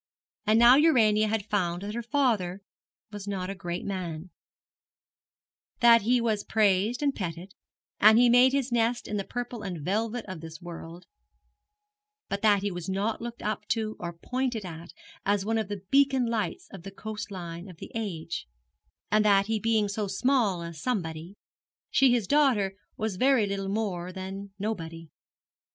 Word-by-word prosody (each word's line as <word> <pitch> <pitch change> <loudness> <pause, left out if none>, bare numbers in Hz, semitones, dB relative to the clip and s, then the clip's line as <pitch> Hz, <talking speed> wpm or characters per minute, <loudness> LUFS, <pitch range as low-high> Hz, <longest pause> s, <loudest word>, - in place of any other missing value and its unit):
And 215 +1 +5
now 240 +3 +8
Urania 220 -9 +4
had 215 -2 -1
found 180 -3 -1
that 205 +1 -4
her 235 - -3
father 225 -8 0 0.5
was 205 -1 -8
not 190 -2 -3
a - - -3
great 175 -2 -5
man 180 -3 -5 1.5
that 235 -1 +7
he 245 +4 +3
was 220 -3 0
praised 215 +4 +2
and 280 -1 +2
petted, 180 -1 -6 0.5
and 220 +2 +7
had 245 -1 +6
made 250 +2 +6
his 270 -2 -1
nest 235 0 +1
in 210 - -2
the 200 - -1
purple 245 +1 -5
and 185 -5 -5
velvet 225 +4 -1
of 185 -5 -7
this 160 -1 -9
world, 170 0 -9 1.2
but 200 0 -2
that 205 -2 +4
he 205 - -1
was 175 0 -6
not 200 +4 -1
looked 235 0 -7
up 215 0 -3
to 220 -1 -1
or 175 -1 -4
pointed 250 0 -2
at 170 0 -8 0.3
as 200 -1 +1
one 225 +1 +1
of 215 - -2
the 205 -2 -6
beacon 275 -2 +4
lights 230 - -2
on 195 - -8
the 195 - -8
coast 210 +2 -7
line 175 -1 -7
of 175 - -12
the - - -10
age 170 - -4 0.6
and 215 0 +4
that 200 -2 +4
he 220 +1 -1
being 220 -1 +2
so 205 +1 -2
small 220 -6 +1
a 170 0 -6
Somebody, 165 -2 -3 0.6
she 270 -2 +5
his 240 -4 +2
daughter 250 -8 +3 0.2
was 215 -3 -2
very 260 -1 +4
little 195 -1 -3
more 195 -4 -2
than 190 +1 -7
Nobody. 165 -6 -5
205 Hz, 170 wpm, -28 LUFS, 185-230 Hz, 1.5 s, now